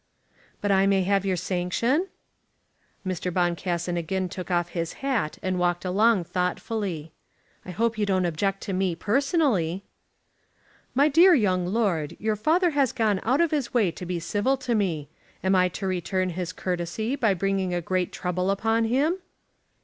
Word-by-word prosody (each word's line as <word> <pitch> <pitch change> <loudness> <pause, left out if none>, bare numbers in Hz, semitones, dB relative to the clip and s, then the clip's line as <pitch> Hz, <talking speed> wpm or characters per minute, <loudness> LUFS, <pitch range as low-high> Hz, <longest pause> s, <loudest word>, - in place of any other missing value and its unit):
"But 205 - +1
I 195 0 +4
may 195 -1 +3
have 195 +1 +1
your 190 - +1
sanction?" 185 - 0 1.0
Mr. 185 -1 -2
Boncassen 175 0 -1
again 185 +2 -2
took 185 +1 -7
off 175 -1 +1
his 170 -1 -3
hat 235 - 0
and 185 -1 -1
walked 175 0 0
along 205 +2 +3
thoughtfully. 180 -2 -3 0.6
"I - - -7
hope 225 +5 -1
you 205 - +1
don't 185 -2 +2
object 195 +4 -1
to 200 - -4
me 185 -2 0
personally." 210 - +1 1.1
"My 280 +3 +5
dear 340 +5 +6
young 185 -7 +1
lord, 180 -7 0
your 215 0 0
father 330 - +2
has 280 -4 +2
gone 215 -5 +1
out 255 +7 +2
of 335 - +2
his 280 -6 -2
way 210 -8 +3
to 165 +3 -8
be 175 -1 -2
civil 205 +10 0
to 255 -2 -2
me. 175 -9 0 0.4
Am 190 +1 +2
I 185 -1 +4
to 195 +2 -6
return 185 0 -1
his 180 0 -4
courtesy 180 +8 -2
by 225 -8 +2
bringing 195 0 0
a 175 - 0
great 180 +1 -1
trouble 180 +1 -2
upon 225 +3 +1
him?" 285 +10 +1
190 Hz, 165 wpm, -25 LUFS, 180-225 Hz, 1.1 s, dear